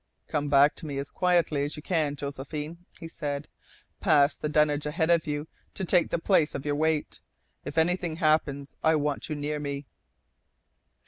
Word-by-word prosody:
"Come 145 -1 -1
back 140 +1 +6
to 160 - -5
me 140 -2 -4
as 140 0 -4
quietly 170 -5 +2
as 145 +1 -3
you 150 - -8
can, 155 -5 0
Josephine," 150 +4 -6
he 165 - -7
said. 145 -3 -4 0.5
"Pass 150 -5 +4
the 150 - -4
dunnage 150 -1 +2
ahead 160 +2 +1
of 170 -2 +3
you 150 +1 -3 0.3
to 190 - -2
take 175 0 +4
the - - 0
place 165 -3 +2
of 140 - -5
your 145 - 0
weight. 155 0 0 0.4
If - - -6
anything 175 0 +1
happens, 155 -4 0
I 160 0 +4
want 150 -1 -1
you 155 - -2
near 150 +1 -3
me." 140 -1 -4
150 Hz, 180 wpm, -27 LUFS, 145-160 Hz, 0.5 s, back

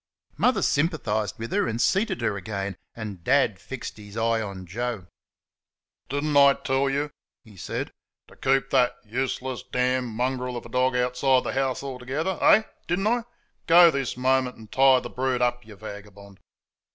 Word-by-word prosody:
Mother - - +2
sympathised 110 - 0
with 115 +1 -6
her - - +1
and 115 0 -3
seated 190 - +1
her 110 -3 0
again, 100 -1 -4 0.2
and 105 -6 -7
Dad 130 -4 +2
fixed 135 -4 -7
his 105 0 -11
eye 115 0 +1
on 100 -3 -6
Joe. 115 +1 -4 1.0
"Did 145 +1 -2
n't 150 -1 -1
I 140 -1 +7
tell 135 +1 0
you," 145 +2 -1 0.3
he 110 -4 -17
said, 90 - -4 0.4
"to - - -17
keep 135 0 +1
that 125 -2 +3
useless 130 +2 -3
damned 125 0 0
mongrel 125 +2 -2
of - - -8
a - - -10
dog 125 +1 +1
outside 125 +1 +2
the - - -3
house 135 0 -1
altogether 140 +7 -3
eh? 220 - +6 0.2
did 175 - +1
n't 195 - 0
I? 240 +1 +1 0.4
Go 170 0 +8
this 135 -4 -3
moment 130 0 +1
and 110 -2 -14
tie 130 -1 +5
the - - -7
brute 130 -1 -1
up, 120 0 0
you 110 - -11
vagabond!" 100 -1 -11
125 Hz, 175 wpm, -25 LUFS, 110-135 Hz, 1.0 s, Go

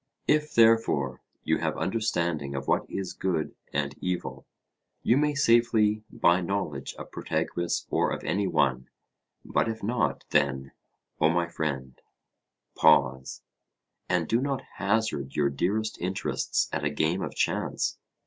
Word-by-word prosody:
If, 150 0 +2
therefore, 115 - +3 0.2
you - - +1
have - - -1
understanding 85 -9 -1
of 70 0 -4
what - - +1
is 95 -2 -4
good 85 -6 -1 0.2
and 70 0 -1
evil, 90 -1 -3 0.6
you 120 - +4
may 150 +1 +2
safely 115 -5 +3
buy 85 +2 +3
knowledge 85 -7 -3
of - - -10
Protagoras 85 -1 -2
or - - +2
of - - -4
any 100 0 0
one; 65 -6 +1 0.6
but - - +1
if 110 -1 -5
not, 120 +3 0
then, 70 -2 +1 0.5
O 80 - +4
my 85 +1 +1
friend, 70 -6 -4 0.7
pause, 65 -1 +3 0.7
and 90 -3 +1
do 115 +2 +2
not 140 -1 -2
hazard 100 -9 0
your 70 -2 +2
dearest 105 +9 -1
interests 90 +2 -1
at - - -1
a 75 - +2
game 80 +5 0
of - - -4
chance. - - -1
90 Hz, 140 wpm, -27 LUFS, 70-110 Hz, 0.7 s, you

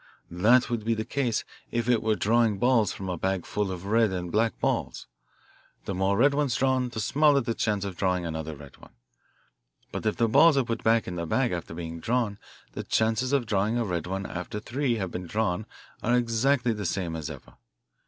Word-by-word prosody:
That 110 +9 +4
would 120 -3 -2
be 115 +1 +1
the 110 0 -3
case 120 -2 -1 0.3
if 120 0 -2
it 120 -3 +3
were 110 -1 +1
drawing 110 0 +2
balls 120 -1 +3
from 95 - -6
a 90 -2 -3
bag 95 -1 -1
full 105 -2 -2
of 90 0 -6
red 110 +2 +3
and 90 -2 -4
black 115 +1 +1
balls - - -1 0.8
the 100 - -3
more 95 +2 +1
red 140 +4 +4
ones 140 -4 +1
drawn 130 -1 +1
the 115 - -6
smaller 145 +5 +3
the 115 -3 -2
chance 105 -3 -1
of 95 -3 -6
drawing 90 -2 0
another 80 -1 -4
red 70 -2 -13
one. - - -17 1.0
But - - -3
if 110 - +1
the 115 - +3
balls 150 +7 +6
are 135 - +4
put 115 -1 -3
back 115 0 +3
in 90 - -4
the 85 -1 -3
bag 125 +8 +1
after 85 -1 -5
being 85 -1 -6
drawn 115 0 -1 0.3
the - - -5
chances 115 +4 +1
of 140 -4 +2
drawing 105 +2 0
a 120 - 0
red 90 -3 -3
one 95 +1 -3
after 90 +4 -5
three 125 +3 -1
have 95 -5 -3
been 90 0 -5
drawn 105 0 -1 0.3
are 120 +2 +2
exactly 120 +1 +1
the 105 -1 -5
same 85 -2 -2
as 80 -2 -5
ever. - - -11
110 Hz, 210 wpm, -27 LUFS, 95-120 Hz, 1.0 s, balls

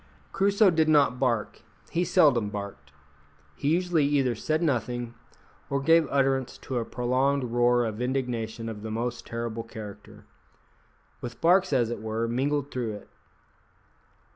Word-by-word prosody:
Crusoe 200 0 +4
did 160 -1 +2
not 140 -5 +4
bark; 120 -5 -1 0.3
he 175 - +1
seldom 140 - +3
barked; 100 -10 -7 0.6
he - - -4
usually 175 -1 +2
either 135 -4 +2
said 155 +8 -1
nothing, 120 -4 -1 0.6
or 140 - 0
gave 165 +2 +4
utterance 135 -2 0
to 130 -2 -3
a 115 - -3
prolonged 130 +4 0
roar 120 0 +2
of 110 +1 -4
indignation 120 -3 -2
of 110 -2 -6
the 110 - -6
most 120 +2 -3
terrible 115 -1 -4
character, 110 -3 -10 1.0
with 120 -1 -7
barks, 180 +2 +4
as 120 -4 +2
it 120 - -5
were, 110 +1 -2
mingled 140 +4 -1
through 120 -4 -3
it. 105 - -12
125 Hz, 140 wpm, -27 LUFS, 115-145 Hz, 1.0 s, Crusoe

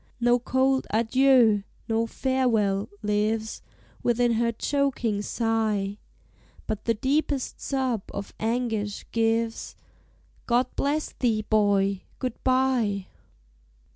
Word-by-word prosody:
No 240 0 +3
cold 265 +2 +1
"adieu," 230 -1 +4 0.3
no 225 0 +1
"farewell," 225 -7 0
lives 215 +1 -1 0.4
Within 240 0 +2
her 235 +1 +1
choking 245 -4 0
sigh, 215 -3 -1 0.7
But 215 -1 -4
the 230 - +2
deepest 275 +3 -1
sob 260 -5 -1
of 200 0 -6
anguish 225 -3 -2
gives, 225 0 0 0.7
"God 245 +1 +3
bless 295 +2 -1
thee, 225 -4 0
boy! 200 -2 +2 0.2
Good 255 -2 -5
bye!" 255 -7 +1
230 Hz, 100 wpm, -26 LUFS, 210-255 Hz, 0.7 s, adieu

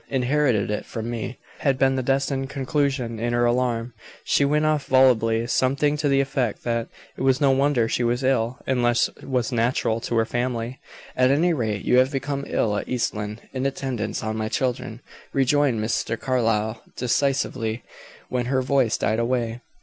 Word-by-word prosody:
"Inherited 130 -5 +1
it 105 - -2
from 115 +1 -5
me," 115 +1 -4 0.2
had 135 -3 +1
been 135 0 +3
the 130 - 0
destined 135 +1 0
conclusion. 135 -4 -1
In 120 +1 -1
her 120 0 +2
alarm, 120 -1 0 0.3
she - - +2
went 150 +2 +2
off 155 -2 +1
volubly, 115 -3 +4
something 135 +4 +1
to 150 -1 0
the 135 0 +3
effect 130 -5 -2
that 115 -1 -1 0.3
"it - - -8
was 130 0 +3
no 140 -3 +4
wonder 135 -3 +2
she 120 - 0
was 120 +2 0
ill: 125 -2 +1
illness 120 -2 +2
was 125 -2 -1
natural 115 -1 +1
to 120 - -3
her 115 0 +3
family." 120 +1 -3 0.4
"At 130 0 +4
any 165 +6 +3
rate, 110 -8 -2
you 125 - +4
have 130 +1 +3
become 140 0 -3
ill 105 -2 0
at - - -5
East 125 -2 0
Lynne, 105 +1 -5
in 130 0 0
attendance 130 -6 -3
on 110 0 -2
my 110 0 -2
children," 125 -2 -2 0.3
rejoined 135 -2 +2
Mr. 110 +1 -1
Carlyle, 115 -4 0
decisively, 125 -2 0 0.4
when 125 -1 -2
her 130 0 +1
voice 130 -4 +2
died 110 +1 0
away. 120 -1 -1
125 Hz, 175 wpm, -24 LUFS, 115-135 Hz, 0.4 s, volubly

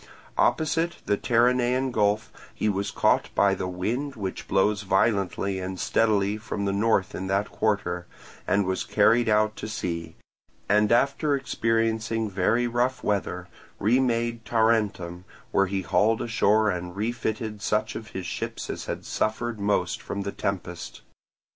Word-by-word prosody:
Opposite 165 +2 +2
the 100 - +2
Terinaean 125 +3 +2
Gulf 105 -1 +1 0.2
he - - -1
was 100 -1 0
caught - - +2
by 100 0 +4
the 95 -1 -3
wind 120 +11 -2
which 95 -3 -5
blows 100 +2 +2
violently 100 -1 +1
and 95 0 -5
steadily 105 -2 +2
from 105 -2 -4
the 100 - 0
north 100 -2 +1
in 95 - -4
that 100 +2 0
quarter, 90 -5 -1 0.4
and 100 0 +2
was 95 0 -1
carried 115 +3 +3
out 110 0 +3
to - - -5
sea; 85 -6 -4 0.5
and 105 +1 +3
after 140 +4 +3
experiencing 115 -3 0
very 100 +6 +2
rough 120 +2 0
weather, 95 -3 -1 0.3
remade 115 0 +1
Tarentum, 105 -7 +1 0.3
where 100 -1 +3
he 95 0 -2
hauled 110 +5 +2
ashore 110 -2 +3
and 90 0 -5
refitted 110 -1 -3
such 105 +1 0
of 110 0 -6
his 95 -2 -6
ships - - -4
as - - -6
had - - -4
suffered 110 +1 -1
most 100 -3 0
from 100 - -4
the 100 - -3
tempest. 90 -4 -4
105 Hz, 145 wpm, -26 LUFS, 95-115 Hz, 0.5 s, by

